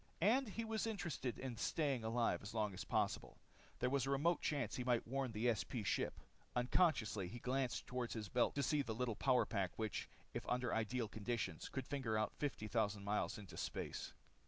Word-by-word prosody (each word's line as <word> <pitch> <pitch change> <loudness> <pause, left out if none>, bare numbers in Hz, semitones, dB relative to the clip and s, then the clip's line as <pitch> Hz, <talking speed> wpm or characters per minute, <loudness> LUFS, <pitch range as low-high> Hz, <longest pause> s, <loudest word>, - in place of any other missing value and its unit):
And 235 +6 +4
he 225 +3 -3
was 220 0 0
interested 170 - -2
in 130 -3 -4
staying 140 -1 +1
alive 115 +1 +2
as 100 +3 -7
long 105 -2 +1
as 95 - -4
possible. - - 0 0.4
There 125 - +1
was 135 -2 +2
a - - 0
remote 150 +5 +3
chance 140 -8 0
he 125 - -1
might 120 -2 +2
warn 135 0 0
the 115 +2 +3
SP 110 +1 -3
ship. - - 0 0.4
Unconsciously, 120 - +3
he 115 - -6
glanced 130 +1 0
toward 125 -1 -2
his 110 -3 -3
belt 120 +5 +2
to 140 - +1
see 150 +2 +3
the 115 -5 -3
little 120 -1 0
power 130 +1 +4
pack 95 -5 0
which, 110 -2 -2 0.2
if - - -2
under 125 -1 +1
ideal 115 +1 0
conditions, 110 +2 -2
could 135 -2 -3
finger 130 -6 0
out 110 - +1
fifty 135 -7 -1
thousand 105 -1 +1
miles 105 +3 0
into 95 -6 -9
space. - - -3
120 Hz, 195 wpm, -40 LUFS, 110-135 Hz, 0.4 s, And